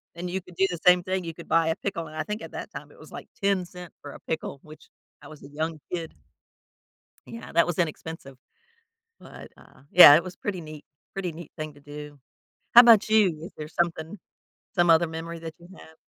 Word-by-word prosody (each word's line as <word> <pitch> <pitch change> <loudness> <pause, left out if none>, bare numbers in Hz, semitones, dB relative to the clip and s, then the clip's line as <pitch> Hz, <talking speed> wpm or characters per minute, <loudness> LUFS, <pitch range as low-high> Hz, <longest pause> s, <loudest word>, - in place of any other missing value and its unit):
and 175 +1 -5
you 190 +2 -3
could 180 0 -17
do 190 +3 +2
the 175 - -5
same 180 0 +6
thing. 185 0 -2
You 165 - -5
could 170 +1 -12
buy 165 0 +3
a 160 - +1
pickle, 175 -5 -4
and 155 - -12
I 155 - -2
think 210 +1 -5
at - - -9
that - - -7
time - - -9
it - - -20
was - - -15
like - - -9
10¢ 180 -3 -2
for 145 - -9
a - - -12
pickle, 160 -3 -4
which 155 0 -15 0.3
I 145 - -13
was 155 -2 -13
a - - -10
young 155 +2 -4
kid 165 -2 -4 1.1
Yeah. 230 - -10
That 170 - +4
was 175 0 -3
inexpensive. 160 -4 -4 0.8
But, - - -12
uh, - - -20
yeah, 170 -5 +10
it 165 - 0
was 185 0 -9
pretty 195 -3 -4
neat, 155 -2 -11 0.3
pretty 185 -3 -4
neat 160 0 -11
thing 155 -1 -6
to 145 - -18
do. 145 0 -10 0.6
How 240 - +12
'bout 230 -4 +6
you? 210 -7 +3
Is - - -10
there 155 0 -7
something 170 +2 -2 0.6
some 175 -1 +3
other 165 +1 +5
memory 165 +1 -7
that 165 -1 -8
you 170 - -15
have? 160 - -16
165 Hz, 220 wpm, -26 LUFS, 155-180 Hz, 1.1 s, How